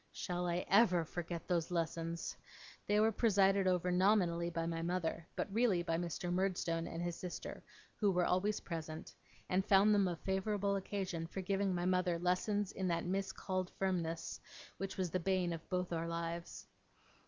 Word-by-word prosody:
Shall 180 0 -2
I 175 +1 -1
ever 185 -5 +5
forget 170 0 -5
those 170 -3 +1
lessons! 165 -1 -2 0.5
They 205 +1 +3
were 220 +1 +4
presided 195 -3 +3
over 180 -1 +2
nominally 180 -2 +3
by 165 -1 -2
my 165 0 -2
mother, 170 -1 -2
but 195 - -3
really 215 -6 +3
by 165 -1 0
Mr. 175 +1 -2
Murdstone 175 -3 0
and 165 +1 -4
his 175 -1 -2
sister, 180 0 -6 0.4
who 210 -3 +3
were 180 -2 +2
always 200 +4 +1
present, 160 -2 -6 0.3
and 185 +1 +2
found 200 +1 +5
them 200 -2 +4
a 175 - -1
favourable 200 +3 0
occasion 190 -4 -3
for 190 - -5
giving 195 0 0
my 175 0 -1
mother 180 -1 +2
lessons 185 +3 0
in 190 -2 -2
that 170 -1 0
miscalled 185 0 -2
firmness, 170 -4 -1 0.4
which 195 0 -4
was 185 -3 -1
the 185 - +1
bane 180 -1 +1
of 165 0 -8
both 180 -1 -1
our 165 0 -1
lives. 170 0 -4
180 Hz, 170 wpm, -36 LUFS, 170-195 Hz, 0.5 s, ever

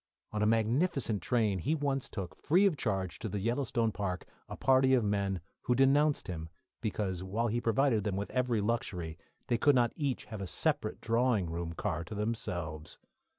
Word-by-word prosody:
On 105 - -2
a 105 - +3
magnificent 115 - +2
train 110 -3 +1
he 150 - 0
once 140 -3 -1
took, 95 -5 -5
free 180 +7 +3
of 190 -5 +3
charge, 95 - -2
to 110 - -4
the 105 - -3
Yellowstone 115 +1 0
Park, 90 -4 -3 0.2
a - - -6
party 130 0 +4
of 120 - +2
men, 100 -3 0 0.2
who 125 - +2
denounced 140 +3 +3
him 80 -3 -5 0.3
because, 100 -5 -2
while 110 +5 -1
he 120 +2 0
provided 115 -1 +2
them 100 -2 -1
with 100 +1 -3
every 125 -4 +1
luxury, 90 -7 -2 0.3
they 120 - 0
could 145 +2 +5
not 120 -2 +3
each 140 -5 -2
have 110 -3 -7
a 95 - -4
separate - - 0
drawing 115 -6 +1
room 85 0 -3
car 80 0 -2
to 95 - -7
themselves. 85 -8 -3
110 Hz, 185 wpm, -32 LUFS, 95-125 Hz, 0.3 s, could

